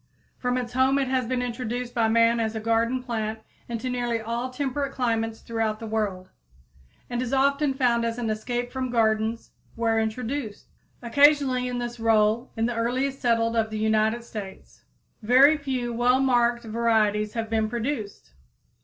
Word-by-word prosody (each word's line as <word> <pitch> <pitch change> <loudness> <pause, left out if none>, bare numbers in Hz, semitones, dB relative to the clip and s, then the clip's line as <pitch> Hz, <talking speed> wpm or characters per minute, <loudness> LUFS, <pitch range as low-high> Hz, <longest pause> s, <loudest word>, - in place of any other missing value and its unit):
From 250 0 0
its 245 -1 -4
home 260 +2 +3
it 275 -1 0
has 260 -2 0
been 250 0 -1
introduced 245 0 -4
by 230 -2 +2
man 230 +1 +3
as 225 -1 -1
a - - -2
garden 230 +3 0
plant 220 -3 -3 0.3
into 235 +2 -4
nearly 240 -2 -1
all 235 +3 -3
temperate 275 +1 -2
climates 225 -3 -1
throughout 225 -2 -2
the 225 - -7
world, 210 -4 -3 0.8
and 245 0 -3
is 250 -1 -3
often 280 +1 +2
found 240 -3 +2
as 230 0 -2
an 240 -2 -2
escape 245 +3 -3
from 260 -1 -3
gardens 220 -1 0 0.2
where 225 -1 +1
introduced 225 +1 -3 0.4
occasionally 270 0 +4
in 250 0 -3
this 240 -1 -5
role 225 +2 +2
in 225 - +1
the 240 - -1
earliest 260 +4 -1
settled 230 -1 +1
of 220 -1 +1
the 215 - -4
United 220 +2 +1
States. 205 -4 -10 0.4
Very 260 +7 +6
few 260 -5 -3
well 245 +2 +3
marked 240 -2 +2
varieties 215 -2 +1
have 225 -1 -3
been 220 -1 0
produced. 220 - -4
235 Hz, 165 wpm, -25 LUFS, 225-250 Hz, 0.8 s, Very